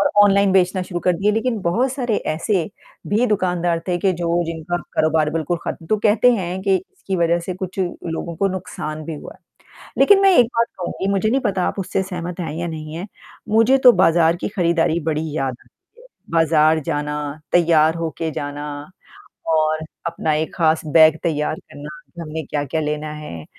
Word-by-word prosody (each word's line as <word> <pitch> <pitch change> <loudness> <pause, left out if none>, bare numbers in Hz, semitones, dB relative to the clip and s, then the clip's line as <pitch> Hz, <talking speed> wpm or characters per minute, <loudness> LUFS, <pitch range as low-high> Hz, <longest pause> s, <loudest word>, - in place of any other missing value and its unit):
और - - +2
ऑनलाइन 200 -1 +4
बेचना 185 0 +2
शुरू 175 -1 -5
कर 180 - +2
दिए 200 +4 +2
लेकिन 225 +1 -1
बहुत 235 +10 +1
सारे 245 -5 -1 0.2
ऐसे 175 +2 0 0.4
भी 220 +5 +2
दुकानदार 180 -5 0
थे 180 - +1
कि 190 +2 +2
जो 170 0 +1
जिनका 165 +1 -3 0.2
कारोबार 155 -1 +2
बिल्कुल 165 +2 -1
खत्म 165 - -5
तो 215 - +2
कहते 220 +4 +4
हैं 185 -4 -2
कि 195 -1 +2
इसकी 190 +1 -6
वजह 170 0 +2
से 185 - -3
कुछ 185 +1 -7
लोगों 170 -2 -4
को 195 +3 +1
नुकसान 155 -4 -5
भी 160 - -5
हुआ 150 - -10
है। - - -29 0.4
लेकिन 405 -1 +6
मैं 390 -1 +6
एक 240 - +6
बात 230 0 +3
कहूँगी 185 +1 -3
मुझे 200 +2 +1
नहीं 265 +4 +1
पता 195 -6 0
आप - - -3
उससे 190 0 -1
सहमत 180 -2 -6
हैं 160 -4 -4
या 170 +1 -3
नहीं 155 -1 -6
हैं। 180 +5 -6 0.5
मुझे 225 +4 +5
तो - - +11
बाज़ार 165 0 +4
की - - -1
खरीदारी 170 -4 +1
बड़ी 155 +1 -2
याद 135 -3 -1
आती 475 - -28
है। - - -18 0.3
बाज़ार 160 -1 +3
जाना, 150 -1 -3
तैयार 165 -2 +4
होके 165 -1 -3
जाना 145 +1 -5 0.8
और 155 -1 +2 0.3
अपना 165 -2 -1
एक 155 +1 -2
खास 160 -2 +2
बैग 155 0 +6
तैयार 155 -3 -1
करना, 145 -4 -11 0.3
हमने 160 0 -5
क्या-क्या 145 +2 -2
लेना 150 0 -3
है। 85 - -8
170 Hz, 185 wpm, -20 LUFS, 155-190 Hz, 0.8 s, तो